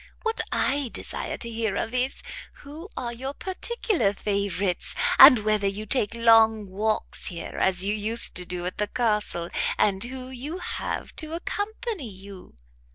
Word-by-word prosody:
What 450 -1 +3
I 280 -3 0
desire - - -3
to 235 - -1
hear 225 -3 -2
of 225 - -2
is, 255 +1 -1 0.4
who 310 +7 -9
are 240 -1 -3
your 265 +4 -6
particular 380 - 0
favourites; 200 -2 -1 0.2
and 220 -5 +10
whether 215 -2 +2
you 200 +2 -4
take 220 -1 +1
long 225 -2 +5
walks 210 +3 -2
here, 170 -2 -6
as 190 0 +4
you 205 - +1
used 215 +2 -3
to 180 - 0
do 180 -1 -3
at 180 - -5
the 210 - +1
Castle, 210 -7 -1 0.3
and 195 -2 +2
who 255 +1 -6
you 270 +7 -6
have 360 - -4
to 315 0 -3
accompany 410 - -4
you?" 195 - -12
225 Hz, 160 wpm, -25 LUFS, 200-270 Hz, 0.4 s, and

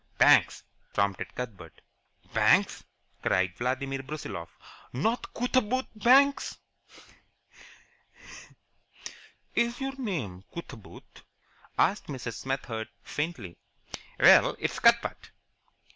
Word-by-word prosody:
"Banks," - - +5 0.3
prompted 100 -2 -1
Cuthbert. 100 -10 -8 0.5
"Banks!" - - +3 0.4
cried 95 0 +1
Vladimir 135 +2 -2
Brusiloff. 135 - -7 0.4
"Not 220 - -1
Cootaboot 255 +1 +1
Banks?" 270 +6 +4 3.0
"Is 235 +1 0
your 270 0 -3
name 130 - -4
Cootaboot?" 135 - -11 0.6
asked 205 - +2
Mrs. 125 -5 -5
Smethurst, 120 -3 -4
faintly. 145 - -5 0.6
"Well, - - +7
it's - - -3
Cuthbert." - - +2
135 Hz, 80 wpm, -28 LUFS, -, 3.0 s, Well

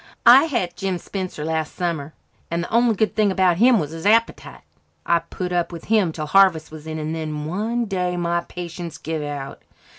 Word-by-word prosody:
"I 255 +5 +9
had 235 - -2
Jim 190 0 -2
Spencer 185 -4 -5
last 160 -1 -2
summer 160 -4 -3 0.3
and 170 +1 -1
the - - -8
only 235 -1 +4
good 215 +1 0
thing 210 -2 +3
about 185 -3 +2
him 235 +2 +5
was 150 -3 -3
his 165 +4 -4
appetite. 230 +2 +1 0.4
I 170 - +3
put 180 +2 -6
up 175 -1 0
with 170 -1 -9
him 210 -6 +2
till 155 -1 -5
harvest 170 -2 +3
was 155 0 -10
in, 160 0 -4
and 155 0 -3
then 155 -2 -4
one 220 +8 -1
day 180 -3 -2
my 170 0 0
patience 170 -1 -7
give 160 0 -4
out. 145 -2 -6
175 Hz, 200 wpm, -22 LUFS, 160-200 Hz, 0.4 s, I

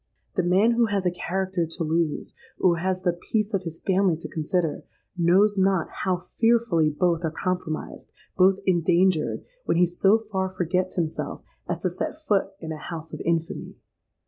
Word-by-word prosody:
The 185 - +2
man 185 +6 +4
who 235 0 +3
has 200 -3 -1
a 180 - +3
character 185 -1 -2
to 165 +1 -4
lose, 160 -1 -1 0.3
or 175 -2 +4
who 165 - -5
has 185 0 -1
the 175 -2 +2
peace 210 +5 -2
of 195 - +1
his 165 -3 -6
family 190 -3 +2
to 165 - -7
consider, 160 0 -1 0.3
knows 190 +4 +4
not 190 -3 +2
how 185 -1 +1
fearfully 225 -4 +2
both 170 +2 0
are 160 - +1
compromised, 180 -1 -4 0.2
both 190 +1 +5
endangered, 175 -1 +2 0.2
when - - +1
he 180 - +6
so 195 +5 +3
far 190 -1 0
forgets 185 0 -1
himself 165 -3 -3 0.3
as - - -2
to - - +1
set - - -3
foot 210 -12 +1
in 160 -1 -6
a 155 - -4
house 165 -1 -7
of - - -5
infamy. 165 -1 -2
180 Hz, 175 wpm, -25 LUFS, 165-190 Hz, 0.3 s, he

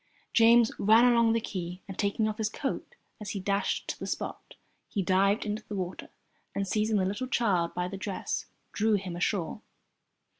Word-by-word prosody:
James 230 0 +6
ran 220 +4 +6
along 235 -2 +5
the 230 - +2
quay, 180 -4 -5
and 195 - -7
taking 205 +2 0
off 215 +1 -4
his 215 -1 +1
coat 270 +5 -4 0.3
as 210 - -5
he - - -2
dashed 200 +1 -1
to - - -4
the - - -5
spot, - - -5 0.3
he 200 - -1
dived 195 +4 +2
into 210 +1 -3
the 210 - -5
water 185 -1 -4 0.5
and, 200 0 -1
seizing 215 +2 +1
the 190 - +2
little 205 +7 -2
child 195 -9 +1
by 180 0 -1
the 195 +2 -6
dress, 190 0 -3 0.2
drew 215 0 +2
him 185 -3 -3
ashore. 180 +2 -1
205 Hz, 185 wpm, -29 LUFS, 190-220 Hz, 0.5 s, James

